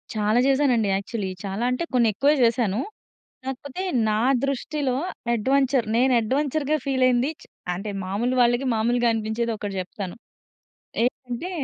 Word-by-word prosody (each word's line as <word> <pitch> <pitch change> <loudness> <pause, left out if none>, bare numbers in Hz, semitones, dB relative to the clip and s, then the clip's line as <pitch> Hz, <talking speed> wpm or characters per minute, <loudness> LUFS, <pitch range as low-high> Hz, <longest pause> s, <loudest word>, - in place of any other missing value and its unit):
చాలా 215 +3 +2
చేశానండి 265 -6 +3
యాక్చువలీ. 200 0 -3
చాలా 200 +4 -3
అంటే 250 +7 -1
కొన్ని 235 -2 +4
ఎక్కువే 285 +8 +3
చేశాను. 230 -3 +2 0.7
కాకపోతే 270 +6 -5 0.3
నా 210 - +1 0.3
దృష్టిలో 275 -1 -1 0.4
అడ్వెంచర్. 265 +2 +2
నేను 255 +2 +4
అడ్వెంచర్‌గా 285 +5 0
ఫీల్ 265 -2 +1
అయింది 250 +3 +2
చ్ - - -14 0.3
అంటే 200 +4 -5
మాములు 215 +7 -1
వాళ్ళకి 240 +2 +3
మాములుగా 240 +2 +2
అనిపించేది 225 +1 -1
ఒకటి 205 -2 -5
చెప్తాను. 185 0 -7 0.9
ఏంటంటే 250 +7 -2
240 Hz, 130 wpm, -24 LUFS, 215-270 Hz, 0.9 s, కొన్ని